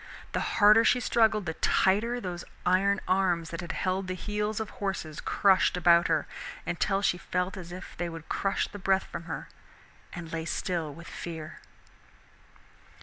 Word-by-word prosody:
The - - -1 0.2
harder 215 +1 +7
she 250 - +4
struggled 220 -4 +2
the 160 - -2
tighter 220 +9 +2
those 180 -5 -5 0.2
iron 190 +2 +3
arms 180 -3 +1
that 165 - -4
had 175 +1 -5
held 185 +1 -1
the 185 - -2
heels 210 +3 -2
of 220 -2 -4
horses 190 -6 -3
crushed 190 -2 +3
about 170 0 +5
her, 160 -2 +1 0.4
until 195 +3 0
she 180 - +2
felt 180 +2 -2
as 175 -3 -8
if 185 +2 -9
they 175 -1 -2
would 165 -1 -9
crush 195 - 0
the 205 - -9
breath 190 0 +2
from 170 - -7
her, 165 - -5 0.6
and 165 -2 -8
lay 160 -1 -2
still 165 -2 -2
with 170 +4 -11
fear. 165 +2 -7
185 Hz, 165 wpm, -29 LUFS, 170-200 Hz, 0.6 s, harder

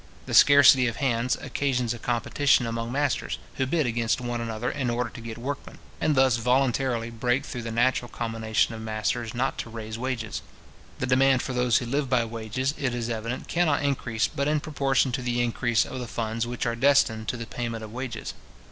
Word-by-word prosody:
The - - -6
scarcity 140 -3 +7
of 115 - -2
hands 125 -1 +1
occasions 125 -4 -1
a 120 - -8
competition 125 +3 +2
among 115 0 -3
masters, 140 -1 -1 0.2
who 130 - 0
bid 155 +1 +1
against 115 0 0
one 120 -1 -3
another 115 +1 -2
in 135 -4 -2
order 120 -1 -1
to 120 - -10
get 115 -1 -7
workmen, 140 +4 -6 0.2
and 155 - +1
thus 130 -3 +4
voluntarily 125 -1 +1
break 120 +4 0
through 125 - -5
the 115 0 -5
natural 120 +1 +1
combination 115 -1 -1
of 110 - -7
masters 110 +2 -2
not 130 +2 -1
to - - -4
raise 110 0 -6
wages. 125 -3 -3 0.6
The - - -2
demand 130 0 +3
for 130 - -4
those 125 -2 +3
who 125 - -2
live 135 +2 -1
by 125 -3 +2
wages, 115 +4 -3
it 125 -4 -1
is 120 -1 -3
evident, 115 +3 -4
cannot 160 -5 +1
increase 120 -5 0
but 140 +1 -2
in 150 0 +2
proportion 135 -3 +1
to 130 +1 -2
the 120 -1 -1
increase 120 -1 +1
of 130 - -6
the 125 - -5
funds 115 +2 -2
which 120 0 -3
are 115 -1 0
destined 120 -4 +3
to 125 - -2
the 115 - -5
payment 115 -1 -4
of 110 0 -9
wages. 125 -3 -5
120 Hz, 200 wpm, -26 LUFS, 115-130 Hz, 0.6 s, scarcity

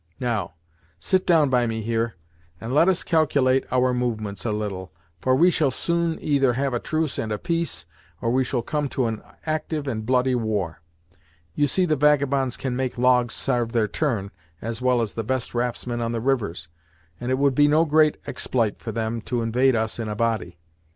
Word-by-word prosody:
Now, 110 -10 -2 0.4
sit 185 - 0
down 155 -6 +4
by 125 -2 +3
me 110 -1 -3
here, 115 +1 -1 0.4
and 115 +6 -5
let 160 +5 +5
us 190 -2 +2
calculate 140 -5 +2
our 130 0 +2
movements 110 -5 -2
a 115 - 0
little, 100 -5 -4 0.3
for 130 +6 +2
we 175 +6 +5
shall 150 -5 +2
soon 170 +4 0
either 135 -4 +2
have 135 +1 -1
a 120 - 0
truce 155 +1 -2
and 110 - -3
a 105 - -1
peace, 165 - -2 0.3
or 115 - 0
we 130 +2 +3
shall 125 -2 -2
come 145 +2 -2
to 130 - 0
an 110 -2 -2 0.2
actyve 155 -1 -2
and 115 -5 -3
bloody 130 +2 +2
war. 105 -9 -2 0.7
You 145 +10 +2
see 185 +7 +2
the 155 -3 +2
vagabonds 140 -3 +2
can 130 -2 -3
make 130 -1 -2
logs 125 -1 +3
sarve 120 -3 -1
their 115 -3 +2
turn, 105 -5 -2 0.3
as 115 +3 -5
well 125 -2 +3
as 105 - -5
the 115 - -3
best 130 +2 -2
raftsmen 120 0 -2
on 115 0 -1
the 115 - -1
rivers, 110 -10 -1 0.5
and 120 - -4
it 130 - +2
would 140 0 +3
be 145 +3 +5
no 155 +3 +4
great 155 0 +3
expl'ite 115 -5 -1
for 115 - -5
them 115 +1 -2
to 120 -2 0
invade 125 +3 +3
us 110 +1 -2
in 110 -2 -3
a 105 - -3
body. 110 -6 -1
125 Hz, 200 wpm, -24 LUFS, 115-140 Hz, 0.7 s, let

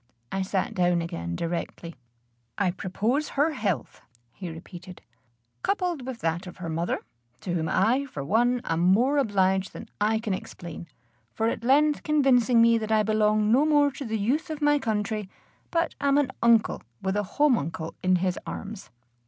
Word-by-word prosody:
I 195 - -1
sat 190 0 -1
down 175 -1 +2
again 85 - -4
directly. 170 - -4 0.6
"I 185 -3 +2
propose 215 +10 -1
her 300 +3 +3
health," 200 - -3 0.3
he 180 +5 -7
repeated, 175 +2 -10 0.6
"coupled 355 -9 -1
with 245 -3 -6
that 170 +1 -1
of 180 - -10
her 175 -3 -5
mother, 165 +2 -2 0.4
to 180 - -3
whom 160 -2 -1
I, 250 +8 +2
for 145 - -6
one, 240 - +2
am 165 0 -1
more 230 +11 +3
obliged 190 -5 +1
than 225 - -9 0.2
I 220 - +2
can 220 -3 -2
explain, 170 -2 -7 0.5
for 225 +1 +1
at 230 - -4
length 290 +4 +3
convincing 255 -6 +4
me 230 0 +5
that 220 0 -4
I 215 -1 +4
belong 215 0 +2
no 260 +5 +5
more 295 -2 +4
to 275 - -7
the 220 -3 -2
youth 275 - 0
of 310 -2 -4
my 295 -1 +3
country, 210 -3 -2 0.4
but 335 0 0
am 280 0 +3
an 280 -3 +2
uncle 230 -2 +3 0.2
with 190 0 0
a 205 - +2 0.2
homuncle 170 - +1
in 185 0 +3
his 180 0 0
arms." 205 -1 -7
215 Hz, 170 wpm, -26 LUFS, 185-260 Hz, 0.6 s, me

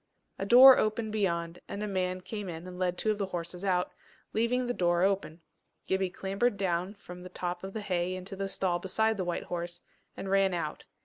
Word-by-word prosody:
A 195 - -2
door 255 +3 +10
opened 215 0 0
beyond, 170 -5 -1
and 205 - -5
a - - -2
man 185 -2 -1
came 205 0 -5
in 165 0 -7
and 180 0 -8
led 180 -1 0
two 220 - +1
of 210 - -3
the 200 - -1
horses 175 0 -5
out, 180 -2 +1 0.4
leaving 240 +3 +1
the 245 - -1
door 175 -3 +2
open. 190 -4 0 0.4
Gibbie 190 -1 0
clambered 195 +5 -1
down 185 +1 -1
from 180 -3 -11
the 180 - -9
top 180 0 -4
of 195 0 -6
the 220 - -4
hay 180 -2 -1
into 185 +2 -7
the 195 0 -3
stall 180 -2 0
beside 220 +5 +1
the 190 - -2
white 175 - -2
horse, 175 0 -5 0.4
and 195 - -5
ran 195 -2 +3
out. 155 -3 -4
190 Hz, 210 wpm, -30 LUFS, 180-205 Hz, 0.4 s, door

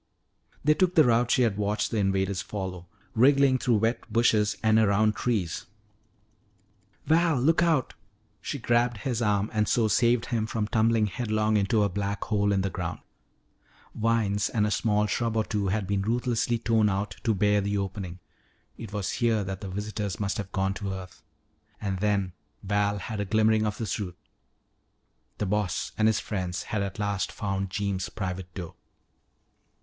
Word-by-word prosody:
They 150 - +5
took 180 +2 +1
the 160 - +7
route 120 -1 +3
she 125 - +4
had 110 -4 +1
watched 105 0 -1
the 115 - -1
invaders 95 -1 0
follow, 95 -3 -6 0.3
wriggling 135 +2 +4
through 120 -2 +2
wet 115 +1 -1
bushes 110 -2 +2
and 110 0 +4
around 105 0 +3
trees. 105 -9 -2 1.4
"Val, 165 -3 +3
look 160 +7 +3
out!" 160 -7 +2 0.5
She 140 - -4
grabbed 120 -1 +1
his 120 -2 -2
arm 105 -1 +1
and 105 -1 +1
so 115 -2 +3
saved 120 +2 +3
him 110 -2 0
from 110 -2 -2
tumbling 110 0 +2
headlong 110 +1 0
into 105 +1 +2
a - - +3
black 100 +1 -3
hole 105 -2 +1
in 100 -1 +2
the 95 0 -2
ground. 90 -2 -4 1.0
Vines 105 -3 +1
and 105 -3 +1
a 105 - -1
small 105 -1 +1
shrub 115 +2 -1
or 110 - +3
two 105 -2 -2
had 100 +1 0
been 100 +1 0
ruthlessly 120 +2 0
torn 110 -2 +2
out 100 +1 -2
to 110 -3 +2
bare 105 +1 +3
the 100 +1 -1
opening. 95 -2 -4 0.6
It 115 -3 -7
was 100 -2 -2
here 115 -4 +1
that 95 0 -5
the 100 - -5
visitors 105 0 -4
must 100 -2 -1
have 100 -1 -5
gone 95 0 0
to 100 -1 -4
earth. 90 -2 -9 0.6
And 95 -3 -3
then 100 -3 0 0.3
Val 100 +1 +1
had 105 +2 -5
a 100 - -1
glimmering 110 +1 +3
of 105 0 -3
the 115 - -3
truth; 95 -5 -4 1.2
the 105 - -1
"Boss" 100 -2 -1
and 110 - +3
his 110 -2 +2
friends 95 -3 -3
had 105 - -2
at 100 -1 -4
last 100 -2 -1
found 95 -1 -3
Jeems' 95 -1 -2
private 95 -2 -5
door. 85 -4 -6
105 Hz, 175 wpm, -27 LUFS, 100-115 Hz, 1.4 s, the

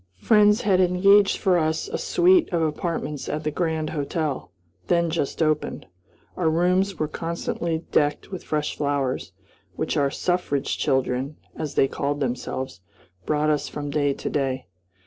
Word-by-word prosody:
Friends 210 - +4
had 190 -3 +3
engaged 195 +3 +5
for 185 -4 +2
us 160 - 0
a 470 +3 -3
suite 360 -1 +3
of 170 -2 +1
apartments 155 -2 -3
at 155 +1 -3
the 150 - -1
Grand 160 -1 -1
Hotel, 145 - -3 0.4
then 170 -1 +2
just 160 0 -1
opened. 155 -1 -1 0.5
Our 170 -3 +1
rooms 180 +3 +2
were 155 - -1
constantly 165 0 -3
decked 145 +3 +1
with 185 - -6
fresh 150 -1 -2
flowers, 140 -3 -1 0.4
which - - -2
our 140 -1 +3
"suffrage 175 -3 -1
children," 130 +2 0 0.2
as 155 -3 -5
they 135 - +4
called 145 +1 -2
themselves, 130 -5 -3 0.5
brought 150 0 +2
us 150 - -1
from 145 -1 -5
day 145 -2 +1
to - - -6
day. 130 -2 -1
155 Hz, 150 wpm, -24 LUFS, 145-180 Hz, 0.5 s, engaged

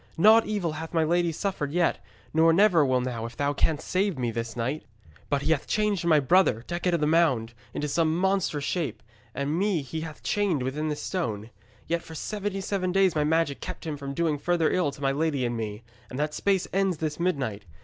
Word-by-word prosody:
Naught 220 +6 +6
evil 200 -6 -1
hath 160 +2 -6
my 165 - +4
lady 170 +1 +2
suffered 160 -4 -3
yet, 175 +1 +1 0.3
nor 160 +1 +5
never 180 -2 +5
will 130 -2 +2
now 125 -3 -3
if 115 - -13
thou 145 0 +1
canst 155 0 0
save 190 -3 0
me 120 -2 -1
this 115 0 -4
night. 130 +6 -2 0.5
But 140 -1 0
he 155 - +1
hath 150 -3 0
changed 210 -4 0
my 160 -3 +5
brother, 135 - +3
Decet 175 0 -1
of - - 0
the - - +3
Mound, 150 -8 +2 0.2
into 150 - -3
some 160 +2 +1
monstrous 190 -6 0
shape, 165 0 -2 0.3
and 140 +2 -1
me 195 -6 +1
he 160 +4 -5
hath 160 -1 -8
chained 195 -10 0
within 145 +4 -2
this 150 -1 -3
stone. 115 - -3 0.3
Yet 170 0 -1
for 160 - -11
seventy 205 +2 -3
seven 190 -2 -1
days 190 -2 +3
my 150 - +2
magic 160 -2 +1
kept - - -7
him 155 -2 -3
from 140 -1 -6
doing 160 -2 0
further 170 0 +1
ill 180 -5 +1
to 140 0 -9
my 135 - +3
lady 145 -2 0
and 120 0 -1
me; 110 -1 -5 0.3
and 125 - -7
that 150 +1 -1
space 195 +1 +1
ends 195 -3 +1
this 155 0 -3
midnight. 135 - -1
160 Hz, 215 wpm, -27 LUFS, 140-180 Hz, 0.5 s, Naught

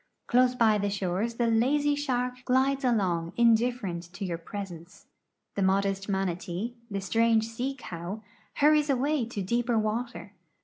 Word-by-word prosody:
Close 250 +1 +3
by 220 -3 +4
the 205 0 0
shores 200 +3 -2
the 235 - +1
lazy 270 +6 +2
shark 250 -3 -2
glides 270 +2 +2
along 185 -9 +1
indifferent 225 -7 +2
to 195 - -5
j'our 170 -2 -4
presence. 190 -1 -8 0.5
The 200 - -2
modest 195 +1 +1
manatee, 190 +3 -2 0.2
the 200 -1 -3
strange 225 +3 +2
sea 250 +4 -3
cow, 185 -1 -7 0.3
hurries 300 0 +4
away 275 -1 +1
to 210 -4 -4
dee})er 235 +3 +1
water. 215 -1 -3
225 Hz, 140 wpm, -28 LUFS, 195-250 Hz, 0.5 s, by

